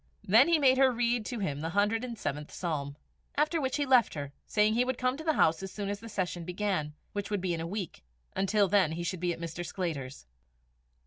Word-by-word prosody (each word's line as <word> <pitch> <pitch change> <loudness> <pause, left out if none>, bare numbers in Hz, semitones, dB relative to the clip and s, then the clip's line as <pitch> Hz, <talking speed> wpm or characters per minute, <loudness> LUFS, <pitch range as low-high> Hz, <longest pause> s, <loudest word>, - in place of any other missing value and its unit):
Then 225 - +6
he 335 -1 +5
made 265 -3 +4
her 265 -1 +6
read 240 -2 0
to 245 - -4
him 150 -9 -2
the 165 - -2
hundred 205 +5 +1
and 240 -2 -5
seventh 150 -3 -4
Psalm; 145 -5 -3 0.4
after 305 +2 +2
which 265 +1 -1
he 290 - +1
left 255 -8 +4
her, 140 -1 -5
saying 210 0 +3
he 240 +2 +3
would 255 -1 -2
come 255 0 +1
to 315 - -7
the 315 -1 +2
house 160 +1 +3
as 190 0 -6
soon 200 0 -4
as 205 0 -3
the 230 +2 -10
session 180 -4 -2
began, 180 -4 -2 0.2
which 205 -1 -3
would 205 -1 0
be 180 -1 -1
in 165 - -3
a 165 - -3
week; 195 -1 -5 0.3
until 200 +1 +2
then 185 -5 +3
he 170 +1 -4
should 180 +1 -3
be 175 0 0
at 170 - -5
Mr. 170 +1 -5
Sclater's. 155 - -4
200 Hz, 240 wpm, -30 LUFS, 170-240 Hz, 0.4 s, Then